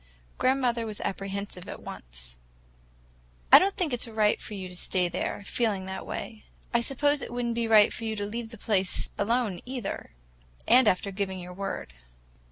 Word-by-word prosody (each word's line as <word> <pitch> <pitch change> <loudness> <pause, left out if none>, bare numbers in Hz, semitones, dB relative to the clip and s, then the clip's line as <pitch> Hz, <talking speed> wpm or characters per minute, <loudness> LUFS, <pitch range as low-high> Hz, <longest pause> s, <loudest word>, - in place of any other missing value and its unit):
Grandmother 250 -3 +2
was 210 -1 -5
apprehensive 195 -1 -4
at - - -6
once. - - -10 1.1
"I - - +12
don't 390 +1 +1
think 340 -9 +1
it's 245 0 -2
right 215 -2 +2
for 210 - -6
you 190 -2 -5
to 180 - -8
stay 180 0 0
there, 200 - -3
feeling 205 -6 0
that 190 0 -6
way. 220 -2 -6 0.3
I 235 - +4
suppose 285 +3 +2
it - - -5
would 245 0 -2
n't 235 - 0
be 230 0 0
right 215 -2 +6
for - - -6
you 220 0 -1
to 205 -1 -2
leave 225 +2 -4
the 230 - -10
place 195 -3 0
alone, 220 -3 +1
either, 245 - -5 0.5
after 215 -5 +5
giving 190 -1 -2
your 180 0 -8
word. 195 - -5
215 Hz, 175 wpm, -28 LUFS, 190-235 Hz, 1.1 s, I